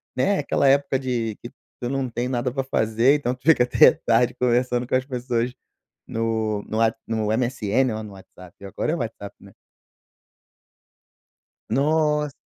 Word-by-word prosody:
né? 190 +10 +1
Aquela 140 -1 +1
época 140 0 +3
de 120 -5 -2
que 120 - -8
tu - - -32 0.3
tu 120 - -2
não 135 -2 -2
tem 120 +2 -3
nada 125 0 -2
pra 135 -1 -1
fazer, 115 +1 +2
então 130 -4 -2
tu 125 - -29
fica 145 -4 +5
até 125 - +6
tarde 120 +1 +1
conversando 125 0 0
com - - 0
as 130 0 0
pessoas 125 -2 -2 0.5
no 110 -2 -2
no 110 - -4
What 115 0 +2
no 110 -2 -2
MSN, 120 0 0
ó 110 - -5
no 105 - -10
WhatsApp. 95 0 -15
Agora 100 +10 -3
é - - +1
o - - -6
WhatsApp, 110 -3 -6
né? - - -15 2.2
Nos 150 +3 +1
125 Hz, 170 wpm, -23 LUFS, 115-135 Hz, 2.2 s, até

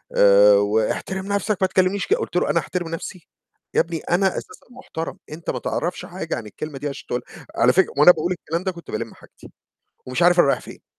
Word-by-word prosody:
آآ 100 +1 +7
"واحترم 110 - 0
نفسك 200 0 0
ما 190 - +4
تكلمنيش 190 +1 +1
كده." 435 +5 +2
قُلت 450 - -5
له: - - +1
"أنا - - +3
أحترم 175 -2 -4
نَفْسي! 165 +1 -7 0.5
يا - - +3
ابني 165 0 -4
أنا 190 +3 +1
أساسًا 430 - -6
محترم، 165 -10 -7
أنت 165 +2 -7
ما - - -2
تعرفش - - -3
حاجة - - -4
عن 115 - -7
الكلمة 140 +7 -7
دي 145 - -4
عشان 140 - -9
تقولها." 125 - -6
على 125 +2 +4
فكرة 190 -1 +2
وأنا 150 +5 +9
باقول 170 +2 -2
الكلام 170 -1 -3
ده 190 - -1
كنت 170 -1 -11
بالِم - - -4
حاجتي - - -17 0.6
ومش 130 +7 -1
عارف 175 +1 +5
أنا 140 - +4
رايح 135 - +2
فين. - - -13
170 Hz, 215 wpm, -22 LUFS, 135-185 Hz, 0.6 s, وأنا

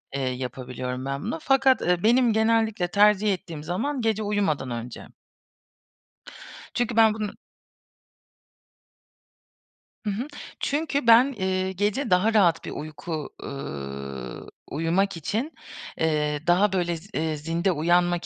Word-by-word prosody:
eee, 140 - -1
yapabiliyorum 125 0 -4
ben 140 +1 -3
bunu. 240 +10 -3
Fakat, 270 -3 +4
eee, 175 0 +1
benim 240 +1 +4
genellikle 220 -4 +2
tercih 205 +2 +4
ettiğim 165 -4 -7
zaman 235 - -2
gece 220 -1 0
uyumadan 195 -11 0
önce. 120 0 -6 1.7
Çünkü 240 -1 -1
ben 225 -1 +6
bunu 215 -1 -3 2.7
Hı - - 0
hı. 220 +7 -3 0.3
Çünkü 290 -3 -1
ben, 235 +4 +7
eee, 190 0 0
gece 205 +7 -1
daha 185 +5 +3
rahat 175 -6 +3
bir - - -5
uyku, 155 0 -5
ııı, 70 - -6 0.2
uyumak 170 +5 0
için, 225 - -2 0.4
eee, 150 -2 +1
daha, 185 +3 +4
böyle, 175 -2 0
z 185 +5 -15
eee, 160 -2 -1
zinde 165 +5 0
uyanmak 175 +2 +2
180 Hz, 120 wpm, -25 LUFS, 150-220 Hz, 2.7 s, ben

